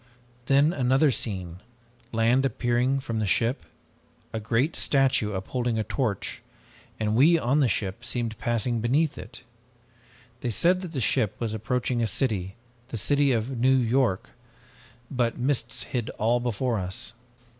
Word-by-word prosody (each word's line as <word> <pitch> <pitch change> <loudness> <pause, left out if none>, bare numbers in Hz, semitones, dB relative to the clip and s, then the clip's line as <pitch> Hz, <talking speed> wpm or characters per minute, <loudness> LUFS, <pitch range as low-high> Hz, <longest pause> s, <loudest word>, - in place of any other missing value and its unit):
"Then 140 +4 +4
another 135 +2 +3
scene, 95 -7 -2 0.5
land 115 +4 +2
appearing 125 +1 0
from 115 -4 -3
the 105 - 0
ship. 115 +7 0 0.7
A 110 - -2
great 115 +8 0
statue, 135 -6 +2
upholding 120 +5 -2
a 110 - 0
torch, 110 -5 -2 0.6
and 110 -1 0
we 155 +8 +6
on 140 0 +1
the 140 - +4
ship 100 +1 -2
seemed 120 -2 -2
passing 120 0 0
beneath 135 +7 +1
it. - - -11 1.0
They 125 - -3
said 180 - +3
that 175 -3 -7
the 135 - -2
ship 105 -2 +2
was 115 -2 -3
approaching 120 +2 -1
a 115 - +1
city, 100 -4 -1 0.3
the 120 - -5
city 140 +5 +2
of 120 +1 -1
New 130 +2 +4
York, 120 -5 +1 0.8
but 120 -3 0
mists 125 -2 -1
hid 120 -3 -3
all 115 +3 +2
before 120 -1 -1
us. 95 +4 -5
120 Hz, 145 wpm, -26 LUFS, 110-135 Hz, 1.0 s, we